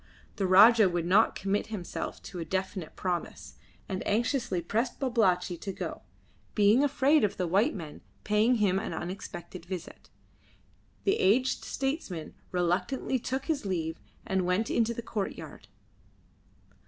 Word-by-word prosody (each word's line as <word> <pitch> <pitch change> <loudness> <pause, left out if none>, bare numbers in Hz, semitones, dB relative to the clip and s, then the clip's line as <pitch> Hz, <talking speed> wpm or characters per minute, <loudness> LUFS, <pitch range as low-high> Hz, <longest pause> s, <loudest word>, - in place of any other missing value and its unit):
The 195 -3 0
Rajah 210 +2 +7
would 175 -1 -1
not 200 +6 +4
commit 195 +1 -1
himself 210 -6 -5
to 185 - -7
a - - -2
definite 190 0 -3
promise, 180 -2 -4 0.3
and 190 -1 -3
anxiously 235 -2 0
pressed 225 +8 -2
Babalatchi 190 -9 +1
to 195 - -5
go, - - -5 0.5
being 210 +5 +5
afraid 285 +1 +3
of 205 - 0
the 180 - 0
white 195 +7 +2
men 160 -6 -8 0.2
paying 215 +4 +3
him 195 -4 +2
an 220 - -4
unexpected 175 -1 -7
visit. 180 -1 -8 0.9
The 400 +2 +2
aged 250 +7 +2
statesman 270 - -3 0.2
reluctantly 180 +9 0
took 265 +3 -3
his 310 -4 -1
leave 165 -4 -3 0.2
and 190 -1 0
went 180 +5 0
into 235 0 +1
the 235 - -5
courtyard. 210 -4 -5
200 Hz, 140 wpm, -29 LUFS, 180-235 Hz, 0.9 s, Rajah